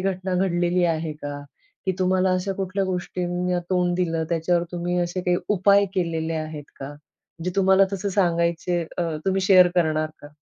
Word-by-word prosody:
घटना 185 -1 -2
घडलेली 175 -1 +1
आहे 160 -2 -1
का? 145 -1 -7 0.5
की 190 - +2
तुम्हाला 185 0 +2
अशा 185 +2 -1
कुठल्या 195 0 -2
गोष्टींना 180 -1 -2
तोंड 180 -1 +1
दिलं? 165 -3 0
त्याच्यावर 170 +1 +1
तुम्ही 175 +1 -2
असे 175 +1 -2
काही 180 -1 +2
उपाय 200 0 +4
केलेले 165 -3 -1
आहेत 155 -2 -5
का? 140 +2 -7 0.5
जे 180 - 0
तुम्हाला 190 0 +5
तसं 195 +1 -2
सांगायचे 175 -2 +1 0.2
अ, - - +2 0.2
तुम्ही 195 0 +1
शेअर 185 -2 +6
करणार 155 -2 +1
का? 145 - -11
180 Hz, 160 wpm, -23 LUFS, 170-185 Hz, 0.5 s, शेअर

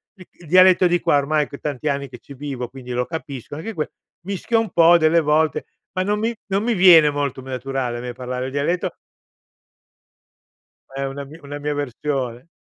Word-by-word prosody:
Il 185 -3 -15
il 175 - -17
dialetto 185 +2 +6
di 175 0 +2
qua 170 -4 +3
ormai 150 +1 +1
che 140 - -10
tanti 145 0 -4
anni 140 -1 -1
che 125 - -10
ci 140 - -13
vivo, 135 -3 -5
quindi 125 0 -10
lo 125 0 0
capisco 145 -4 -7
anche 190 +9 -6
que 155 -6 -3 0.3
mischio 200 +4 0
un 225 -2 -1
po' 170 +1 +6
delle 165 +1 +4
volte 155 +1 +1 0.3
ma 185 - 0
non 205 +2 0
mi 225 +2 0
non 195 0 0
mi 235 +1 +1
viene 175 -6 +7
molto 145 -2 -2
naturale 130 -1 -3
a - - -6
me 125 0 -5
parlare 125 +1 -4
il - - -6
dialetto. 150 +6 -1 2.0
È 135 +1 -4
una 135 +1 -4
mi 145 +3 -12
una 145 +1 -7
mia 145 0 -2
versione. 135 -2 -3
145 Hz, 195 wpm, -21 LUFS, 135-170 Hz, 2.0 s, viene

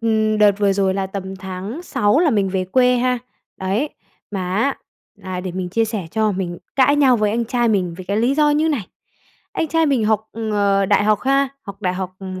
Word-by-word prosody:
ừm, 220 -1 +1
đợt 210 -1 +6
vừa 200 -1 +3
rồi 195 -1 +1
là 195 -1 -1
tầm 190 0 -6
tháng 190 - -6
6 210 -5 +1
là 330 -3 +3
mình 200 -5 +1
về 185 -1 -1
quê 250 +6 +3
ha. 250 0 +1 0.4
Đấy, 200 +10 -1 0.4
mà 185 -3 -3
á 270 +6 +1 0.4
là 185 -2 -5
để 185 -1 -5
mình 185 0 -3
chia 225 +5 +1
sẻ 215 -5 -4
cho, 215 0 +1
mình 180 -2 -4 0.2
cãi 280 +2 +4
nhau 265 -4 +5
với 210 -1 +1
anh 235 +2 0
trai 240 0 0
mình 185 -5 0
vì 185 - -8
cái 200 +3 -2
lý 240 +5 +2
do 300 0 +3
như 305 +2 +2
này. 265 - -1 0.7
Anh 320 - -1
trai 325 +1 +2
mình 260 -6 +2
học, 220 0 0 0.2
ờ, 200 -1 +2
đại 205 +1 +3
học 215 -1 +2
ha, 275 +1 +2
học 200 0 -10
đại 180 -1 0
học, 185 -1 -4
ừm, 185 -1 -7
210 Hz, 225 wpm, -20 LUFS, 190-250 Hz, 0.7 s, đợt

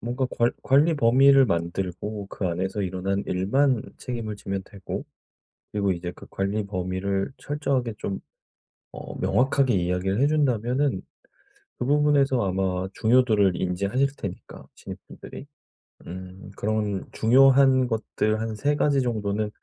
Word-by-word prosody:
뭔가 125 +2 -2
관 120 0 +3
관리 145 +5 +4
범위를 135 +1 +5
만들고 95 +3 -3
그 95 - -3
안에서 95 +4 -2
일어난 95 +2 -2
일만 115 +7 +1 0.2
책임을 115 -4 -5
지면 95 -1 -4
되고 100 -3 -7 0.7
그리고 100 -2 +1
이제 90 0 -5
그 - - -13
관리 100 +2 -2
범위를 95 +2 -2
철저하게 140 -5 -2
좀 95 - -4 0.7
어 - - -8
명확하게 135 -1 +2
이야기를 90 +4 0
해 140 - +5
준다면은 135 -2 +1 0.8
그 - - -2
부분에서 140 -2 +3
아마 95 -1 -1
중요도를 110 -5 +3
인지하실 100 +10 0
테니까 90 -2 -8
신입분들이 - - -10 0.6
음 95 +2 -9
그런 105 -2 -1
중요한 130 +2 +5
것들 110 -1 -1
한 115 -1 -3
3 145 +6 0
가지 140 -2 +2
정도는 105 -3 -1
110 Hz, 285 characters per minute, -25 LUFS, 95-130 Hz, 0.8 s, 범위를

